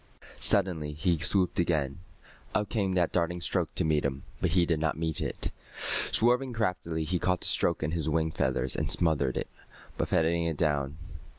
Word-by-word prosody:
Suddenly 85 -7 +2
he 80 +2 0
swooped 90 +2 +2
again. 75 -4 0 0.6
Up 105 - 0
came 100 -5 0
that 90 -3 +1
darting 90 0 0
stroke 85 -2 -1
to - - 0
meet 75 -1 +2
him. 70 0 -2 0.2
But 90 - +2
he 90 -2 +4
did 80 -2 0
not 80 -1 -1
meet 80 -1 -1
it. - - -2 0.6
Swerving 125 +2 +3
craftily, 90 -7 -1
he 90 +3 -1
caught 90 0 0
the - - -1
stroke 85 - +2
in 75 - -1
his 80 -2 -1
wing 80 +1 0
feathers 65 -3 -1
and 75 +1 -1
smothered 75 -6 +2
it, - - -2 0.5
buffeting 85 +1 +1
it 80 -3 -2
down. 70 -2 0
85 Hz, 180 wpm, -29 LUFS, 75-90 Hz, 0.6 s, he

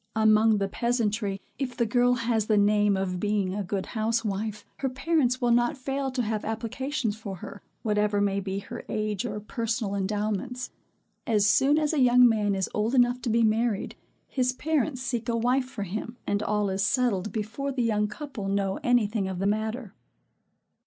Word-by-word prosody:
Among 220 0 +5
the 200 -1 0
peasantry, 215 -3 -1 0.2
if 255 -3 -3
the 235 - +2
girl 245 +2 +3
has 230 -3 0
the 215 - +3
name 205 0 +3
of 185 -1 -2
being 205 -2 0
a 205 +1 -2
good 190 +1 -3
housewife, 215 -2 -2
her 270 - -1
parents 260 -2 +1
will 245 -1 +2
not 240 +5 +2
fail 270 +1 -2
to 255 -1 -1
have 215 -1 -2
applications 230 +2 -2
for 210 -3 -6
her, 195 +2 -9 0.2
whatever 210 -1 +1
may 200 -1 +1
be 195 0 -3
her 200 - -7
age 215 -1 -2
or 210 -1 -4
personal 225 -1 -2
endowments. 210 +5 -2 0.6
As 210 -3 +3
soon 270 +8 +4
as 305 0 +1
a 305 - +1
young 250 -1 +7
man 210 -3 +1
is 190 -1 -1
old 220 +5 0
enough 245 0 +3
to 240 - -2
be 230 +1 +3
married, 220 -1 +1 0.3
his 255 -2 0
parents 285 -2 -1
seek 240 -2 -2
a 230 - +1
wife 250 +3 +2
for 250 -5 -6
him, 220 +5 -5
and 205 0 0
all 210 -2 0
is 190 +1 0
settled 215 -2 +1
before 235 +6 -3
the 255 -2 -1
young 210 -2 +1
couple 215 -2 -6
know 195 -1 0
any 245 -3 +3
thing 205 -2 -2
of 190 -1 -4
the 195 - -2
matter. 220 +2 -2
220 Hz, 185 wpm, -27 LUFS, 205-245 Hz, 0.6 s, young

